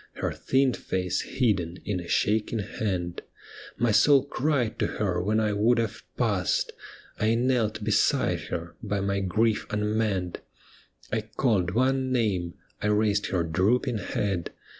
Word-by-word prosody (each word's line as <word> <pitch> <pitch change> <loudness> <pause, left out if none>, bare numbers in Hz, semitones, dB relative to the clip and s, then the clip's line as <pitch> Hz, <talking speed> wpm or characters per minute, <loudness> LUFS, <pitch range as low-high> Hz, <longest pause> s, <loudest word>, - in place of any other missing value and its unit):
Her - - -2
thin 130 -1 +1
face 90 -4 -2
hidden 95 -9 0
in 100 -3 -1
a 85 - -8
shaking 110 +4 +1
hand; 95 -4 -3 0.6
My 120 -1 +2
soul 140 +5 +5
cried 140 -5 0
to - - +2
her 90 -4 0
when 105 +4 +1
I 105 -1 +1
would 110 +4 +3
have 115 -1 -2 0.2
passed, 100 -7 +1 0.5
I 110 +1 +2
knelt 120 -3 +1
beside - - +2
her, 85 0 -4
by 100 - -2
my 100 0 0
grief 105 +4 +1
unmanned. 105 -4 -1 0.7
I 110 - 0
called 105 -4 0
one 130 +1 +2
name, 100 -8 0 0.3
I - - 0
raised 105 -1 +2
her 90 -3 0
drooping 105 +8 +1
head. 95 -2 -2
105 Hz, 140 wpm, -27 LUFS, 95-115 Hz, 0.7 s, soul